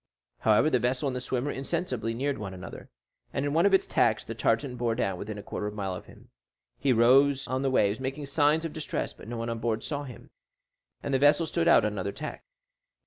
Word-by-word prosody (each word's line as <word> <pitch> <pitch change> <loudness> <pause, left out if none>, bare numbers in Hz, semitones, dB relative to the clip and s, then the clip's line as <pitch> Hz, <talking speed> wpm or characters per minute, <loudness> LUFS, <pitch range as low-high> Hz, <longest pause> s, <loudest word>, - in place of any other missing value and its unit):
However, 110 +8 +4
the 125 - +3
vessel 125 +4 0
and 135 -2 -1
the 125 - -3
swimmer 130 +2 -2
insensibly 130 -6 -2
neared 140 +1 -1
one 100 -3 -6
another, 90 - -9 0.4
and 135 - -2
in 145 - -1
one 170 +5 +4
of 200 - +1
its - - +2
tacks 110 -2 +2
the 115 - -5
tartan 115 +3 0
bore 120 -2 0
down 95 -4 -1
within 105 0 -5
a 100 - -7
quarter 105 - -4
of 105 - -5
a - - -12
mile 95 -3 -3
of 90 - -8
him. - - -17 0.5
He 135 - +2
rose 135 +4 +4
on 130 +1 -1
the 135 - +1
waves, 105 -5 +2
making 135 +2 -4
signs 150 +3 +2
of 165 - -4
distress; 155 -2 -3
but - - -14
no 120 +1 -5
one 115 +1 -3
on 115 -1 -3
board 115 -1 -1
saw 145 -1 -3
him, 125 -4 -12 0.7
and 140 - -2
the 135 - +3
vessel 145 +4 +5
stood 170 +1 -1
on - - +6
another 100 -2 -2
tack. 155 +8 -7
125 Hz, 235 wpm, -28 LUFS, 110-145 Hz, 0.7 s, on